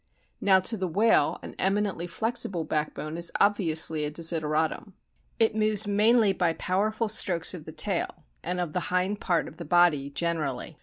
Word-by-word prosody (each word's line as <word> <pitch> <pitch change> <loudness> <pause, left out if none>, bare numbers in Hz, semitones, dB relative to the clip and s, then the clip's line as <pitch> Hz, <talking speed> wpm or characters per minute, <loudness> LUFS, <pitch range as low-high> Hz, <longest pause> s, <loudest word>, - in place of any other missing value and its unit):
Now 190 -1 +5
to 225 +4 -2
the 185 -1 -2
whale 215 +7 +2
an - - -8
eminently 195 -3 0
flexible 220 -4 -1
backbone 155 +1 -3
is 170 0 -2
obviously 160 -6 +2
a 150 - -1
desideratum. 160 +3 -1 0.4
It 220 -1 +2
moves 215 -1 +2
mainly 210 +1 +3
by 175 -3 0
powerful 215 +6 -1
strokes 185 -6 +1
of 165 -4 -9
the - - -8
tail 175 -2 -2 0.2
and 180 +2 -2
of 175 -4 -3
the 180 - 0
hind 185 +3 0
part 175 -3 0
of - - -12
the 170 - -6
body 155 -4 +3
generally. 155 -2 -3
180 Hz, 165 wpm, -27 LUFS, 160-205 Hz, 0.4 s, Now